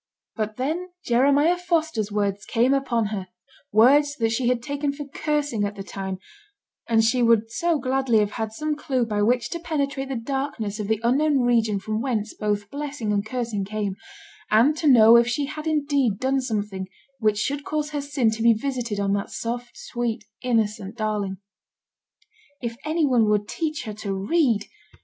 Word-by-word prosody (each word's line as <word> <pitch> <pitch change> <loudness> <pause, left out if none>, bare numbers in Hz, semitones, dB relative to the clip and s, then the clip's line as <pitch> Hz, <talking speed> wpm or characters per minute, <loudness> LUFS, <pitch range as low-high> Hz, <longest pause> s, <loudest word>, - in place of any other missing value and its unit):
But 215 -1 -3
then 320 +8 -2 0.2
Jeremiah 285 +8 +3
Foster's 320 - 0
words 205 -1 -1
came 245 +3 +2
upon 245 -5 +1
her; 190 -3 -4 0.4
words 285 +7 +5
that 225 -4 0
she 240 +2 0
had 245 -1 +1
taken 285 +2 -1
for 290 +1 -7
cursing 290 -5 -1
at 205 0 -2
the 195 - -6
time; 190 -1 -5 0.7
and 225 -1 +4
she 245 +3 +2
would 230 -1 +3
so 340 +5 +1
gladly 260 -3 +1
have 210 -1 +2
had 220 -1 -3
some 305 +6 -2
clue 260 -4 -1
by 210 -2 -1
which 240 +2 +1
to 340 - -3
penetrate 280 -5 -2
the 270 - -2
darkness 240 -4 -3
of 210 - -3
the 220 0 +1
unknown 275 +3 +3
region 230 -4 +2
from 215 +2 -3
whence 230 -5 -2
both 205 -1 -2
blessing 280 -7 -3
and 205 +1 -1
cursing 230 -5 -2
came, 205 -1 -3 0.5
and 235 +8 +4
to 305 - 0
know 230 -3 +8
if 235 0 +4
she 280 +4 0
had 305 +2 -6
indeed 285 -8 +1
done 265 +3 +1
something 205 -5 -3 0.3
which 215 -2 +2
should 280 +7 -1
cause 300 0 -2
her 295 -1 -2
sin 280 -5 +1
to 220 +1 -4
be 230 0 +6
visited 235 -2 -3
on 200 0 +1
that 200 0 -2
soft, 240 +1 -5
sweet, 235 -3 -3 0.2
innocent 220 -3 -1
darling. 210 -3 -2 1.2
If 235 -2 -4
any 315 0 +1
one 240 -6 +3
would 210 -1 +1
teach 310 -2 -3
her 215 -3 -5
to 205 -2 -4
read! 220 - +1
235 Hz, 180 wpm, -24 LUFS, 215-280 Hz, 1.2 s, know